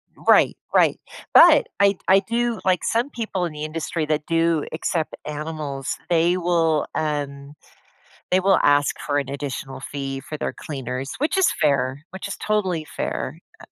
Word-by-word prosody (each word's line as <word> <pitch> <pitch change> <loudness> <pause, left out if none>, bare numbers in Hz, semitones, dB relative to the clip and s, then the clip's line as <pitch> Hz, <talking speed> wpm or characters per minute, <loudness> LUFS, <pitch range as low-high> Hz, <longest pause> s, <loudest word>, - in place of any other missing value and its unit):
Right, - - +4 0.2
right, - - +4 0.3
but 330 -3 +8
I 200 -1 +4
I 195 +1 +6
do 235 +3 -1
like, 185 -2 +2
some 235 +5 0
people 215 -8 -3
in 165 - -5
the 150 0 -6
industry 155 0 -3
that 150 -1 -1
do 165 -2 +1
accept 160 -1 -2
animals, 150 -2 -4
they 170 +1 +3
will, 165 -3 +1
um 145 -2 -3 0.8
they 185 - +4
will 195 +1 +4
ask 145 0 +3
for 145 -1 -1
an 140 - -2
additional 135 -2 -5
fee 135 -1 -5
for 155 - -7
their - - -3
cleaners, 135 -2 -5
which 305 +7 0
is 380 - +5
fair, 140 -1 +1
which 190 +2 -7
is 200 - -5
totally 190 -7 -1
fair. - - -4 0.2
Uh - - -11
155 Hz, 160 wpm, -23 LUFS, 145-185 Hz, 0.8 s, but